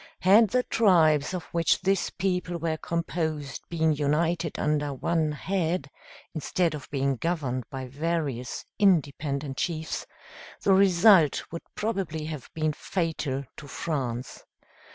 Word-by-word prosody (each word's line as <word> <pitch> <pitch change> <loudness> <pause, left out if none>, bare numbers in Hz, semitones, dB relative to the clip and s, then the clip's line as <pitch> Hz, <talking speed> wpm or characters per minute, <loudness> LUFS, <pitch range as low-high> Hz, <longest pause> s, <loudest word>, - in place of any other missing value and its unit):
Had 205 +4 +6
the 250 +1 +2
tribes 160 - +3
of 175 - -4
which 165 -2 +3
this 195 +1 +1
people 180 -2 -2
were 165 -1 -1
composed 160 -4 -3
been 160 -2 +2
united 160 +3 0
under 150 -2 0
one 160 +3 0
head, 165 -3 -2 0.4
instead 165 +2 0
of 150 -3 -8
being 135 -1 0
governed 135 -6 -2
by 135 -2 -5
various 140 -3 -3
independent 145 -7 +1
chiefs, 160 -2 -3 0.6
the 195 - +5
result 190 -4 +5
would 170 - -5
probably 190 -8 -2
have 155 -4 -6
been 155 -1 0
fatal 150 -6 -2
to 145 - -9
France. 130 -5 -4
160 Hz, 125 wpm, -27 LUFS, 145-175 Hz, 0.6 s, Had